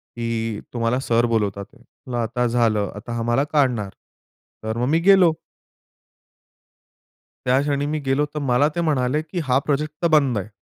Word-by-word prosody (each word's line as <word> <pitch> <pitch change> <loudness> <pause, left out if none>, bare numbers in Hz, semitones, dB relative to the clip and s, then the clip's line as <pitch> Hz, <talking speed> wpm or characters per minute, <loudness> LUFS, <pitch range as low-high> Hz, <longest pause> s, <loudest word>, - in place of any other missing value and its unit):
की 115 -2 -3
"तुम्हाला 120 +1 0
सर 120 -3 +1
बोलावतात 105 -4 -1
आहेत." 130 -4 -21 0.2
म्हटलं 125 -1 -3
आता 120 +2 -1
झालं, 115 -4 +1
आता 115 +3 -7
हा 115 - -2
मला 125 +4 +2
काढणार, 125 -9 +1 0.7
तर 110 +1 -3
मग 120 +1 0
मी 160 +2 +3
गेलो. 185 -2 +5 2.1
त्या 130 +1 +3
क्षणी 145 0 -1
मी 155 +1 -2
गेलो, 135 +2 +2
तर - - -2
मला 135 +2 +3
ते 170 - -1
म्हणाले 145 -3 +1
की 165 +3 -5
"हा 130 0 +3
प्रोजेक्ट 150 +1 -1
तर - - +3
बंद 135 -7 +2
आहे." 100 +1 -5
125 Hz, 170 wpm, -22 LUFS, 115-145 Hz, 2.1 s, गेलो